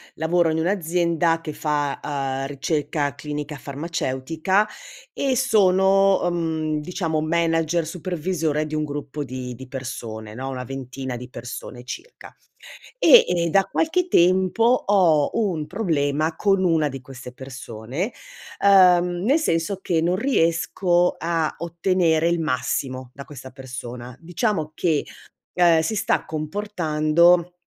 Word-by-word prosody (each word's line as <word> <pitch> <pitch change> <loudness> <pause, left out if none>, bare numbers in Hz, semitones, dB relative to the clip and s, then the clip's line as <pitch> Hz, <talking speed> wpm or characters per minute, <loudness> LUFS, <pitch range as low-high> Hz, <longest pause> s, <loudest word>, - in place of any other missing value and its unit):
lavoro 165 +1 +2
in 160 - 0
un'azienda 170 -2 +1
che 155 -2 -6
fa, 145 -2 -1
uhm, 135 -2 -2
ricerca 145 +1 -2
clinica 150 0 -6
farmaceutica 160 +6 -1 0.5
e 270 -2 0
sono, 195 -5 +4
ehm, 160 -3 -1
diciamo 160 -1 -2
manager 165 0 +1
supervisore 165 -2 -2
di 155 - -8
un 155 - 0
gruppo 145 0 -5
di 125 -1 -6
di 130 +2 -11
persone 115 -5 -7
no, 130 +4 -5
1 130 -1 -5
ventina 130 0 -6
di 125 +1 -8
persone 120 0 -8
circa. 470 - -10 0.6
E - - +8
e 170 -1 0
da 195 +4 +4
qualche 355 - 0
tempo, 185 - +3
ho 190 - +3
un 180 -9 -1
problema 155 -4 0
con 195 -2 +2
1 160 -4 +2
di 135 0 -7
queste 130 -1 -11
persone, 130 - -6 0.5
ehm, 180 -2 +5
nel 275 +8 +3
senso 175 - -1
che - - -2
non 175 +2 +1
riesco 175 -5 +1
a 165 -1 -1
ottenere 170 -1 +1
il 170 0 +1
massimo, 130 -2 -2
da 140 - -9
questa 130 -2 -11
persona. 125 -2 -8
Diciamo 175 -2 -2
che, 155 -2 0 0.5
ehm, 170 -2 +4
si 215 +7 -2
sta 205 - 0
comportando 170 0 +1
160 Hz, 130 wpm, -23 LUFS, 140-180 Hz, 0.6 s, E